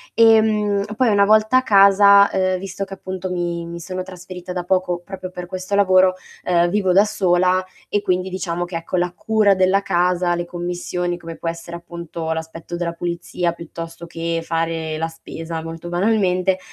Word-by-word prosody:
Ehm, 215 Hz, -3 st, +4 dB
poi 250 Hz, 0 st, +2 dB
una 200 Hz, -1 st, +4 dB
volta 215 Hz, +4 st, +4 dB
a 260 Hz, -, +3 dB
casa, 200 Hz, -2 st, +6 dB
ehm, 185 Hz, -1 st, +1 dB
visto 195 Hz, +1 st, -5 dB
che 195 Hz, 0 st, -7 dB
appunto 185 Hz, -1 st, -6 dB
mi 170 Hz, -1 st, -2 dB
mi 170 Hz, 0 st, -7 dB
sono 185 Hz, +2 st, -5 dB
trasferita 180 Hz, -1 st, -9 dB
da 180 Hz, -, -3 dB
poco 180 Hz, -1 st, 0 dB
proprio 185 Hz, -1 st, -7 dB
per 180 Hz, -1 st, -7 dB
questo 185 Hz, +2 st, -6 dB
lavoro, 185 Hz, -2 st, +5 dB, 0.3 s
ehm, 175 Hz, -1 st, +2 dB
vivo 195 Hz, 0 st, +1 dB
da 200 Hz, +3 st, +6 dB
sola 185 Hz, -3 st, +2 dB, 0.3 s
e 205 Hz, -, 0 dB
quindi 185 Hz, +1 st, 0 dB
diciamo 175 Hz, -2 st, -3 dB
che 175 Hz, -, -8 dB
ecco, 165 Hz, +2 st, -3 dB
la 175 Hz, 0 st, 0 dB
cura 215 Hz, 0 st, +2 dB
della 190 Hz, +1 st, +3 dB
casa, 180 Hz, -1 st, +1 dB
le 175 Hz, 0 st, -3 dB
commissioni 175 Hz, 0 st, -3 dB
come 165 Hz, -1 st, -8 dB
può 165 Hz, -, -3 dB
essere 170 Hz, +1 st, -7 dB
appunto 170 Hz, -1 st, -6 dB
l'aspetto 160 Hz, +1 st, -6 dB
della 170 Hz, -1 st, -2 dB
pulizia 175 Hz, 0 st, -2 dB
piuttosto 165 Hz, 0 st, -8 dB
che 165 Hz, 0 st, -3 dB
fare 165 Hz, -1 st, -2 dB
la 165 Hz, -, -1 dB
spesa 165 Hz, 0 st, -7 dB
molto 165 Hz, +1 st, -7 dB
banalmente, 185 Hz, -1 st, +1 dB
180 Hz, 175 wpm, -20 LUFS, 170-195 Hz, 0.3 s, casa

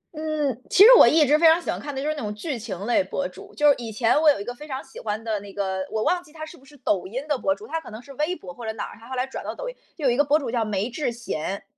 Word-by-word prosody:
嗯， 300 Hz, -5 st, -2 dB
其 390 Hz, -, +7 dB
实 450 Hz, -, +10 dB
我 -, -, +9 dB
一 310 Hz, -1 st, +5 dB
直 295 Hz, +3 st, +4 dB
非 335 Hz, -, +6 dB
常 320 Hz, +1 st, +6 dB
喜 345 Hz, -, -3 dB
欢 -, -, -4 dB
看 290 Hz, -1 st, -6 dB
的 -, -, -3 dB
就 280 Hz, -, -3 dB
是 305 Hz, -, +1 dB
那 300 Hz, -, -6 dB
种 210 Hz, -1 st, -3 dB
剧 255 Hz, +4 st, -4 dB
情 210 Hz, -5 st, -6 dB
类 245 Hz, +6 st, +2 dB
博 280 Hz, 0 st, -3 dB
主。 400 Hz, +1 st, -13 dB
就 295 Hz, -, +3 dB
是 285 Hz, -, +7 dB
以 230 Hz, -2 st, -6 dB
前 225 Hz, +7 st, +2 dB
我 315 Hz, -, +6 dB
有 285 Hz, -, +3 dB
一 -, -, -4 dB
个 245 Hz, +3 st, -5 dB
非 295 Hz, +5 st, -11 dB
常 265 Hz, -2 st, -5 dB
喜 270 Hz, -, -12 dB
欢 215 Hz, 0 st, -4 dB
的 220 Hz, -2 st, -2 dB
那 200 Hz, 0 st, -11 dB
个， 190 Hz, -1 st, -2 dB
我 220 Hz, 0 st, -1 dB
忘 360 Hz, +7 st, +1 dB
记 325 Hz, -, -20 dB
他 310 Hz, 0 st, -7 dB
是 340 Hz, -, -12 dB
不 265 Hz, -, -20 dB
是 290 Hz, +2 st, -17 dB
抖 210 Hz, -8 st, -1 dB
音 260 Hz, +9 st, -5 dB
的 295 Hz, -, +1 dB
博 290 Hz, +2 st, +1 dB
主， 430 Hz, -, -12 dB
他 325 Hz, -6 st, -3 dB
可 -, -, -11 dB
能 215 Hz, -, -8 dB
是 275 Hz, +3 st, -13 dB
微 305 Hz, +6 st, -1 dB
博 180 Hz, -, -10 dB
或 235 Hz, -, -11 dB
者 220 Hz, -, -2 dB
哪 220 Hz, -, -4 dB
儿？ -, -, -13 dB
他 230 Hz, -, -14 dB
后 260 Hz, -, -4 dB
来 250 Hz, -, 0 dB
转 265 Hz, -, -7 dB
到 -, -, -5 dB
抖 -, -, -6 dB
音。 -, -, -6 dB, 0.2 s
就 300 Hz, -, -4 dB
有 255 Hz, -, +5 dB
一 -, -, +1 dB
个 290 Hz, -, +4 dB
博 290 Hz, +1 st, +3 dB
主 275 Hz, -6 st, -4 dB
叫 235 Hz, -2 st, +1 dB
“梅 205 Hz, 0 st, -1 dB
智 260 Hz, 0 st, -2 dB
贤”， 200 Hz, -5 st, -4 dB
270 Hz, 380 characters per minute, -24 LUFS, 220-305 Hz, 0.2 s, 实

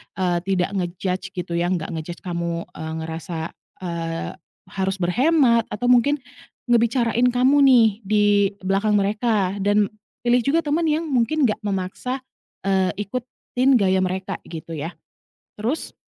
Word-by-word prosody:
eee, 180 Hz, -2 st, +1 dB
tidak 185 Hz, -1 st, +1 dB
nge-judge 180 Hz, +1 st, -2 dB
gitu 175 Hz, -1 st, -4 dB
ya, 175 Hz, -, +1 dB
nggak 170 Hz, -3 st, -2 dB
nge-judge 165 Hz, +1 st, -6 dB
kamu, 170 Hz, -1 st, -3 dB
eee, 160 Hz, 0 st, -6 dB
ngerasa, 160 Hz, 0 st, -5 dB, 0.3 s
eee, 165 Hz, -1 st, -3 dB, 0.4 s
harus 190 Hz, 0 st, -1 dB
berhemat 240 Hz, -, +3 dB
atau 245 Hz, +3 st, -2 dB
mungkin 265 Hz, +4 st, +4 dB, 0.5 s
ngebicarain 235 Hz, 0 st, +3 dB
kamu 255 Hz, +3 st, +3 dB
nih 245 Hz, -4 st, +7 dB, 0.2 s
di 210 Hz, 0 st, +3 dB, 0.4 s
belakang 200 Hz, +3 st, +2 dB
mereka 205 Hz, -1 st, +1 dB
dan 205 Hz, +1 st, +2 dB, 0.3 s
pilih 245 Hz, +1 st, +4 dB
juga 320 Hz, +4 st, +3 dB
teman 315 Hz, +2 st, 0 dB
yang 310 Hz, +2 st, +1 dB
mungkin 275 Hz, +4 st, +1 dB
nggak 215 Hz, -, -2 dB
memaksa, 200 Hz, +7 st, -3 dB, 0.4 s
eee, 190 Hz, -1 st, +2 dB, 0.2 s
ikutin 255 Hz, +2 st, 0 dB
gaya 190 Hz, -4 st, +3 dB
mereka 185 Hz, +1 st, -2 dB
gitu 165 Hz, 0 st, -8 dB
ya. 160 Hz, +4 st, -4 dB, 0.6 s
Terus, 235 Hz, +9 st, -3 dB
200 Hz, 135 wpm, -22 LUFS, 180-245 Hz, 0.6 s, nih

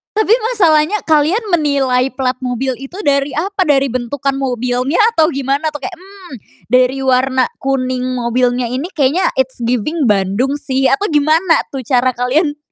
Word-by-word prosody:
Tapi 435 Hz, 0 st, +3 dB, 0.2 s
masalahnya 335 Hz, -1 st, +3 dB
kalian 315 Hz, +8 st, +2 dB
menilai 275 Hz, -6 st, +1 dB
plat 255 Hz, -1 st, -2 dB
mobil 255 Hz, +1 st, -2 dB
itu 270 Hz, +6 st, -10 dB
dari 280 Hz, 0 st, +1 dB
apa, 390 Hz, +4 st, -2 dB
dari 275 Hz, -2 st, +3 dB
bentukan 255 Hz, +3 st, -2 dB
mobilnya, 250 Hz, +2 st, -1 dB, 0.2 s
atau 320 Hz, -7 st, +3 dB
gimana 275 Hz, +1 st, -1 dB
tuh 295 Hz, -, -7 dB
kayak, -, -, -6 dB
"Mmm, 380 Hz, -3 st, -14 dB, 0.4 s
dari 255 Hz, +1 st, +3 dB
warna 260 Hz, 0 st, +2 dB, 0.2 s
kuning 255 Hz, -2 st, -1 dB
mobilnya 245 Hz, +1 st, 0 dB
ini 260 Hz, +7 st, -3 dB
kayaknya 295 Hz, +5 st, +2 dB
it's 265 Hz, -1 st, -1 dB
giving 250 Hz, +5 st, -1 dB
Bandung 205 Hz, +7 st, 0 dB
sih," 270 Hz, -2 st, 0 dB
atau 335 Hz, +10 st, +1 dB
gimana 315 Hz, +4 st, +3 dB
tuh 270 Hz, -2 st, -6 dB
cara 255 Hz, +1 st, +2 dB
kalian 290 Hz, +5 st, 0 dB
270 Hz, 150 wpm, -15 LUFS, 255-305 Hz, 0.4 s, Tapi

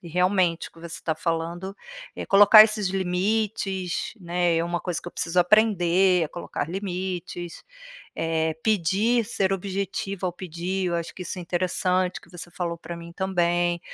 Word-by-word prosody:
e 175 Hz, -, -13 dB
realmente 180 Hz, 0 st, +1 dB
o -, -, -32 dB
que -, -, -18 dB
você 170 Hz, -, -8 dB
está 160 Hz, -, -2 dB
falando, 170 Hz, +4 st, -3 dB, 0.4 s
é -, -, -5 dB
colocar 205 Hz, +2 st, +9 dB
esses 215 Hz, -2 st, 0 dB
limites, 190 Hz, 0 st, -1 dB
né, 175 Hz, 0 st, +1 dB
É -, -, +1 dB
uma 175 Hz, 0 st, -2 dB
coisa 180 Hz, -3 st, -4 dB
que 175 Hz, -, -6 dB
eu -, -, -12 dB
preciso 180 Hz, +1 st, +1 dB
aprender, 185 Hz, -2 st, +4 dB
é 155 Hz, -, -1 dB
colocar 165 Hz, -1 st, -5 dB
limites, 180 Hz, -2 st, -5 dB, 0.5 s
eh, 160 Hz, -1 st, 0 dB
pedir, 215 Hz, +4 st, +2 dB
ser 195 Hz, -3 st, 0 dB
objetiva 195 Hz, 0 st, -3 dB
ao 180 Hz, -, 0 dB
pedir, 180 Hz, +2 st, -4 dB
eu 175 Hz, -, -1 dB
acho 170 Hz, -1 st, -3 dB
que 185 Hz, -, -8 dB
isso 185 Hz, -, -6 dB
é -, -, -6 dB
interessante, 180 Hz, +1 st, 0 dB
que -, -, -20 dB
você 175 Hz, 0 st, -9 dB
falou 170 Hz, -1 st, -4 dB
para 170 Hz, +1 st, -7 dB
mim, 170 Hz, 0 st, -10 dB
também, 175 Hz, -2 st, 0 dB
180 Hz, 170 wpm, -25 LUFS, 170-195 Hz, 0.5 s, colocar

